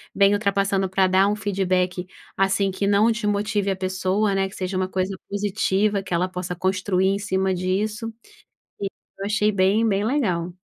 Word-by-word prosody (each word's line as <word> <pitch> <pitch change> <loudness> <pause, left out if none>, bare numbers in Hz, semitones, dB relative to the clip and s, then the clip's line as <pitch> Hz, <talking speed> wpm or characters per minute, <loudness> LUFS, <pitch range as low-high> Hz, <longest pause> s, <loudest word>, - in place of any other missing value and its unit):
vem 200 0 +5
ultrapassando 195 -1 +1
para 190 0 +3
dar 190 +2 +4
um 210 - +1
feedback, 185 -3 -1 0.3
assim, 195 0 +1
que 200 +1 -2
não 205 +3 +4
desmotive 210 -2 0
a - - -1
pessoa, 190 +2 0
né, 195 0 0
que 205 - -13
seja 185 0 -3
uma 185 0 0
coisa 190 +1 -2
positiva, 205 0 0
que 185 - -5
ela 180 +2 +1
possa 180 -1 -4
construir 185 +1 0
em 200 +1 0
cima 190 -1 0
disso, 210 +5 -2 0.7
e 200 - -1 0.3
eu 195 - -4
achei 210 0 +2
bem 200 +4 +3
bem 200 -1 +1
legal. 185 -10 0
195 Hz, 175 wpm, -23 LUFS, 185-205 Hz, 0.7 s, vem